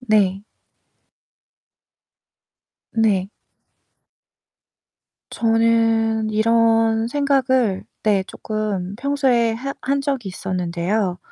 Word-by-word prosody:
네. 205 Hz, -5 st, +1 dB, 2.5 s
네. 205 Hz, -4 st, +1 dB, 2.0 s
저는 225 Hz, -1 st, +2 dB
이런 225 Hz, +1 st, +2 dB
생각을 260 Hz, -6 st, +1 dB, 0.2 s
네 205 Hz, -3 st, +2 dB
쪼끔 205 Hz, -3 st, -4 dB
평소에 250 Hz, -3 st, +1 dB
해 275 Hz, +4 st, -4 dB
한 275 Hz, +2 st, 0 dB
적이 270 Hz, -6 st, -2 dB
있었는데요. 180 Hz, +1 st, -2 dB
225 Hz, 125 characters per minute, -21 LUFS, 200-240 Hz, 2.5 s, 저는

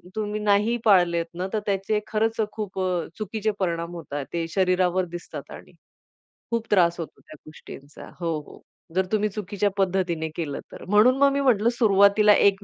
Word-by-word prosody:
तुम्ही 210 Hz, -1 st, -2 dB
नाही 210 Hz, +2 st, +2 dB
पाळलेत 175 Hz, -4 st, +4 dB
ना 180 Hz, +2 st, -3 dB
तर 215 Hz, -, +1 dB
त्याचे 200 Hz, +1 st, 0 dB
खरंच 225 Hz, +1 st, -1 dB
खूप 205 Hz, -3 st, -6 dB
अ, 180 Hz, -2 st, -1 dB
चुकीचे 215 Hz, 0 st, -2 dB
परिणाम 170 Hz, -2 st, -2 dB
होतात 145 Hz, -4 st, -5 dB
ते 165 Hz, -1 st, -1 dB
शरीरावर 185 Hz, 0 st, +1 dB
दिसतात 175 Hz, -, -8 dB
आणि -, -, -11 dB, 0.8 s
खूप 230 Hz, -1 st, -1 dB
त्रास 170 Hz, -3 st, +3 dB
होतो 155 Hz, -3 st, -7 dB
त्या 155 Hz, -, -14 dB
गोष्टींचा. 145 Hz, -2 st, -12 dB
हो, 165 Hz, -3 st, -1 dB
हो. -, -, -14 dB, 0.3 s
जर 190 Hz, 0 st, +2 dB
तुम्ही 215 Hz, 0 st, +1 dB
चुकीच्या 205 Hz, 0 st, -2 dB
पद्धतीने 180 Hz, -4 st, 0 dB
केलं 150 Hz, -5 st, -4 dB
तर -, -, -10 dB
म्हणून 220 Hz, +6 st, +5 dB
मग 280 Hz, 0 st, +4 dB
मी 280 Hz, -, 0 dB
म्हटलं, 235 Hz, -4 st, +3 dB
सुरुवातीला 210 Hz, -2 st, +5 dB
एक 200 Hz, 0 st, +3 dB
195 Hz, 165 wpm, -24 LUFS, 175-215 Hz, 0.8 s, म्हणून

